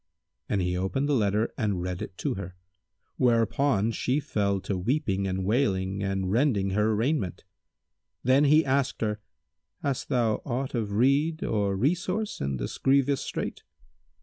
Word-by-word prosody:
And 100 -3 +1
he 90 0 0
opened 95 +10 -1
the 145 - +1
letter 105 -2 +1
and 100 -6 0
read 90 -1 -4
it 90 - -7
to - - -1
her, 95 -1 -7 0.6
whereupon 115 -1 +2
she 130 +5 0
fell 100 -9 0
to 100 - -2
weeping 100 -1 0
and 95 0 -2
wailing 100 -4 0
and 95 -1 -1
rending 110 -5 +2
her 105 +2 +2
raiment. 115 - -1 0.8
Then 135 +3 +4
he 155 +3 +5
asked 135 0 0
her, 105 -1 -1 0.6
"Hast 140 -3 -2
thou 120 -5 +2
aught 130 +1 -3
of 110 -4 -2
rede 140 +8 +2
or 100 -3 0
resource 180 - -1
in 70 -1 -1
this - - -5
grievous 140 0 +3
strait?" - - -4
110 Hz, 150 wpm, -27 LUFS, 95-135 Hz, 0.8 s, he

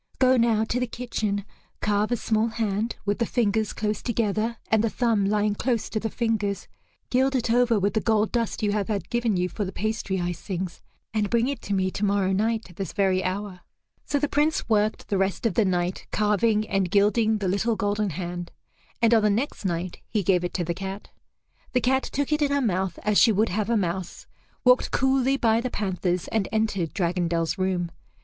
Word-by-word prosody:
Go 260 0 +5
now 230 -3 +3
to 230 +2 -1
the 250 - -1
kitchen, 215 -4 -3 0.3
carve 210 +1 +1
a 240 - +2
small 220 0 +1
hand 225 -1 -1
with 205 +2 0
the 235 - +2
fingers 220 -3 +1
close 210 0 -2
together 225 -1 -1
and 220 -1 +4
the 230 - +2
thumb 225 -4 +1
lying 210 +1 +1
close 230 +1 -1
to 215 - -1
the 225 - -2
fingers, 215 -3 -1 0.4
gild 265 +2 +2
it 240 -2 0
over 240 -1 +4
with 200 +1 +1
the 220 - +1
gold 220 -1 +2
dust 230 -2 -1
you 205 - +2
have 205 -2 -1
had 205 -3 -3
given 235 -4 +1
you 180 0 +1
for 205 - -4
the 190 - -4
pastry 215 -2 -2
icings, 175 0 -4 0.3
and 210 -2 0
bring 235 +1 +2
it 280 -3 -3
to 200 - -2
me 185 -1 +1
tomorrow 200 -1 +1
night 220 +3 0
at 180 - -17
this 195 -5 -4
very 190 -2 +2
hour." 190 0 -3 0.4
So 290 - 0
the 295 +1 +1
Prince 300 +3 +1
worked 215 -1 +1
the 200 - +1
rest 195 +4 -1
of 225 - +2
the 215 - +3
night 180 -1 -1
carving 210 +1 +2
and 195 -2 0
gilding 215 +3 +3
the 200 -2 -2
little 210 +5 +1
golden 205 -1 0
hand, 175 +1 -5 0.5
and 230 0 +5
on 225 - +5
the 210 - +3
next 220 +1 -1
night 175 0 -2
he 210 -3 0
gave 180 -1 +2
it 175 - -3
to 180 - 0
the 170 +1 -2
cat. 195 +2 -7 0.6
The 250 - +2
cat 265 +2 +2
took 285 +2 -3
it 300 - +1
in 290 - +3
her 285 0 +2
mouth 190 -7 0
as 210 -1 +3
she 230 - +6
would 215 +2 +2
have 210 +4 -1
a 235 - +3
mouse, 180 -1 -3 0.4
walked 250 0 +4
coolly 265 0 +2
by 230 -2 +3
the 255 - -2
panthers, 185 -4 -2
and 220 -4 0
entered 215 -7 0
Dragondel's 170 -1 -1
room. 180 -2 0
210 Hz, 210 wpm, -25 LUFS, 190-230 Hz, 0.6 s, she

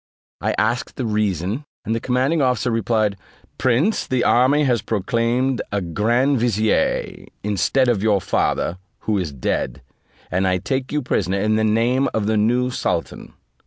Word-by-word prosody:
I - - 0
asked 115 +4 0
the 130 - -3
reason, 105 - -1 0.2
and 110 - -1
the 115 - 0
commanding 130 +6 +1
officer 125 -2 +1
replied, 110 -2 0 0.4
"Prince, 135 - +1
the 130 -2 0
army 135 +5 +4
has 125 -5 +2
proclaimed 115 +4 0
the 100 - -1
grand 120 - +1
vizier, 110 -2 0 0.2
instead 105 +6 +1
of 115 -5 +1
your 105 -2 +3
father, 90 -1 -1 0.2
who 105 -2 0
is 85 -5 -3
dead, 65 -1 -3 0.5
and 95 +2 +1
I 90 0 +2
take 130 +7 -3
you 150 -1 -1
prisoner 95 -5 0
in 110 +2 +1
the 110 - +1
name 120 +5 +2
of 110 -2 0
the 110 +1 +1
new 120 +4 +2
sultan." - - -3
115 Hz, 160 wpm, -21 LUFS, 105-125 Hz, 0.5 s, army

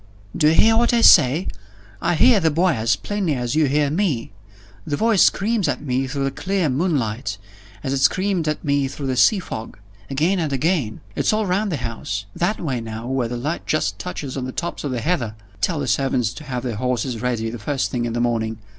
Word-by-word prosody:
"Do 150 - +3
you 155 - +5
hear 225 +5 +5
what 240 +1 +3
I 235 - +3
say? 150 - +6 0.5
I 175 - +1
hear 235 +5 +5
the 165 -3 +2
boy 170 +5 +2
as 115 -1 +1
plainly 195 -7 -2
as 125 -1 -2
you 155 -1 +4
hear 145 +1 +1
me. 155 - -1 0.5
The 145 - -2
voice 220 -3 +3
screams 210 -1 +2
at 135 -3 -1
me 130 -1 -1
through 140 +1 -3
the 135 - 0
clear 180 +4 -1
moonlight, 130 - -1 0.5
as 135 -2 -1
it 135 - 0
screamed 185 +3 +1
at 155 - -2
me 140 -1 +1
through 140 +1 -6
the 130 -1 -1
sea 210 - +5
fog. 115 -11 -6 0.3
Again 160 +8 +1
and 155 -4 -1
again. 135 - 0
It's - - +1
all 215 0 +1
round 195 +2 0
the 155 - -1
house. 110 -5 -4
That 185 +5 0
way 130 -7 -2
now, 110 0 -6
where 130 -3 0
the 120 +1 -4
light 150 +8 -4
just 105 -10 0
touches 130 +9 -5
on 130 -2 -3
the 130 - -4
tops 170 +6 -4
of 145 - -2
the 125 -3 -2
heather. 120 -7 -1 0.3
Tell 170 -4 0
the 140 - -2
servants 125 0 0
to 150 - -10
have 125 -3 -4
the 120 -4 -3
horses 125 -1 -2
ready 115 -3 -1
the 120 - -7
first 135 +6 -2
thing 120 -2 -1
in 115 - -3
the 120 - -1
morning. 115 -2 0
135 Hz, 225 wpm, -21 LUFS, 120-170 Hz, 0.5 s, say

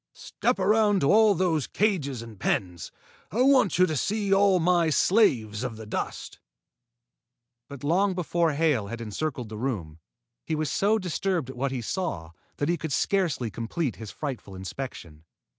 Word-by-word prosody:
"Step 245 - -2
around 205 +1 +3
to 140 - +3
all 215 -1 +5
those 165 -6 0
cages 145 - -1
and 110 -4 -12
pens. 90 -4 -2 0.4
I 235 +5 +2
want 260 - +4
you 185 - +6
to 155 - -2
see 205 +5 0
all 195 -1 +4
my 170 -1 +3
slaves 130 - +2
of 120 -3 -4
the 110 - -9
dust." 105 - -5 1.3
But 140 -2 -10
long 185 +6 +2
before 170 -2 0
Hale 145 -9 +1
had 115 +3 -6
encircled 120 +2 -4
the 110 -1 -7
room, 95 -12 -4 0.4
he 160 - -2
was 155 -3 -2
so 210 +3 +2
disturbed 180 - -2
at - - -13
what 135 +3 -1
he 125 -3 -3
saw 105 - -3 0.3
that 145 - -1
he 175 +1 +1
could 160 -1 -5
scarcely 155 - 0
complete 120 +6 -3
his 110 -2 -8
frightful 130 -9 -6
inspection. 95 - -7
155 Hz, 165 wpm, -26 LUFS, 115-190 Hz, 1.3 s, you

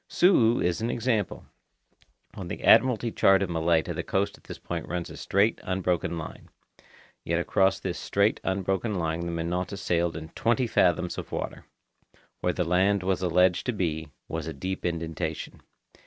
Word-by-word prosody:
Su'u 120 - +4
is 90 +4 0
an 115 - -1
example. 115 -5 -1 0.9
On - - -7
the - - -6
Admiralty 120 -2 +5
chart 95 -2 +4
of 90 - -3
Malaita 80 -1 +1
the - - -3
coast 100 +1 -1
at - - -22
this - - -8
point - - -5
runs 85 0 -4
a - - -9
straight, 100 +3 +1
unbroken 90 -2 -1
line. 80 - -8 0.7
Yet 85 0 0
across 95 +2 +2
this 95 -3 -4
straight, 100 +2 +1
unbroken 95 +3 -1
line 80 -2 -1
the 85 0 -3
Minota 90 +4 -2
sailed 85 -3 0
in 80 0 -8
twenty 120 +8 +1
fathoms 90 -5 +1
of - - -8
water. - - -5 0.7
Where 90 - +1
the 90 - -1
land 95 +3 +2
was 95 -1 0
alleged 90 0 +2
to 125 - +1
be, 80 -6 -2 0.2
was 80 -1 -4
a 80 - -4
deep 95 +7 -4
indentation. 80 -1 -4
90 Hz, 170 wpm, -27 LUFS, 85-100 Hz, 0.9 s, Admiralty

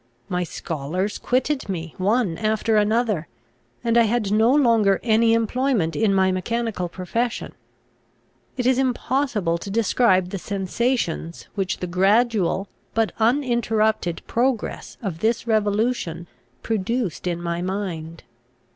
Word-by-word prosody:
My 180 0 0
scholars 170 +5 -3
quitted 260 0 0
me 165 -4 -4
one 205 -2 +1
after 220 +1 +1
another; 210 -5 +1 0.6
and 235 0 +3
I 230 - +5
had 220 -2 0
no 220 +3 +4
longer 230 -8 +4
any 225 0 +4
employment 230 -6 0
in 220 -2 +2
my 190 -1 +3
mechanical 200 -1 -2
profession. 230 +7 -3 1.0
It 250 - -1
is 260 0 +3
impossible 250 -8 0
to 200 - -7
describe 200 -3 +2
the 195 - -4
sensations, 195 -3 -2
which 195 -2 -2
the - - -1
gradual 195 +1 +2 0.3
but 225 -1 +2
uninterrupted 225 - +1
progress 240 -1 -1
of 180 -6 -3
this 225 +4 0
revolution 210 -5 0 0.4
produced 220 -4 -2
in 175 -1 -1
my 170 0 -3
mind. 175 -4 -4
215 Hz, 120 wpm, -23 LUFS, 185-235 Hz, 1.0 s, I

